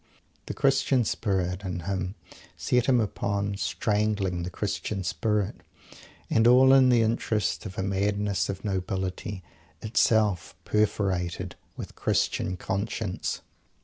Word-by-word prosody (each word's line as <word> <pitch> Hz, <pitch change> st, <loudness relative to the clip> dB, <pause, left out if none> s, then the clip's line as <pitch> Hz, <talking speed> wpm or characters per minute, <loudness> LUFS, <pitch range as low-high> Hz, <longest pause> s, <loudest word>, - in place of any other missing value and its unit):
The -, -, -4 dB
Christian 135 Hz, -2 st, +2 dB
spirit, 95 Hz, -3 st, -1 dB
in 90 Hz, -2 st, -4 dB
him 95 Hz, +1 st, -3 dB, 0.4 s
set 125 Hz, -1 st, +1 dB
him 125 Hz, -2 st, +4 dB
upon 100 Hz, -1 st, -1 dB
strangling 100 Hz, -2 st, 0 dB
the 85 Hz, -, -3 dB
Christian 100 Hz, +1 st, -3 dB
spirit 105 Hz, +3 st, -1 dB, 0.7 s
and 115 Hz, +1 st, +3 dB
all 130 Hz, +2 st, +7 dB
in 130 Hz, -1 st, +6 dB
the 120 Hz, -2 st, +5 dB
interest 110 Hz, -1 st, 0 dB
of 95 Hz, -, -10 dB
a 95 Hz, -, -1 dB
madness 100 Hz, +1 st, 0 dB
of 95 Hz, 0 st, -5 dB
nobility, 95 Hz, 0 st, -3 dB, 0.4 s
itself 110 Hz, -4 st, +1 dB
perforated 95 Hz, -4 st, 0 dB, 0.2 s
with -, -, -7 dB
Christian 90 Hz, 0 st, 0 dB
conscience! 100 Hz, +1 st, -3 dB
100 Hz, 115 wpm, -27 LUFS, 95-110 Hz, 0.7 s, all